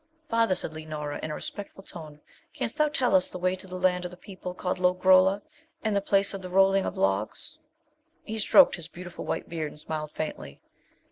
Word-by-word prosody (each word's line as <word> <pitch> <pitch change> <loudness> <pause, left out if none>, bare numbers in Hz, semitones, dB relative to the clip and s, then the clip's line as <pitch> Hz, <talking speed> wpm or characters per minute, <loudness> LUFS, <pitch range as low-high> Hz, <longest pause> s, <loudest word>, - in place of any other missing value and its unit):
'Father,' 230 -4 +3
said 155 - -4
Leonora, 155 -2 -5
in 155 - -4
a 150 - -3
respectful 200 -1 -6
tone, 155 -5 -9 0.4
'canst - - -3
thou 305 - +5
tell 265 -5 +1
us 185 -1 +5
the - - -6
way 185 +1 +1
to 185 - -9
the 185 0 -6
land 180 -1 +2
of 180 - -3
the 180 - -12
people 185 -2 -8
called 180 0 -2
Lo 180 0 +3
grolla, 190 +2 +5 0.4
and 215 -2 +1
the 200 - +2
place 200 0 +3
of 195 - -5
the 185 - -7
Rolling 195 +1 +4
of - - -5
Logs.' 95 +2 -1 0.6
He 220 +1 -4
stroked 270 +4 +6
his 165 -3 -6
beautiful 175 0 -8
white - - -2
beard, 160 -3 -3
and - - -14
smiled 155 0 -4
faintly. 155 - -5
185 Hz, 210 wpm, -27 LUFS, 155-195 Hz, 0.6 s, stroked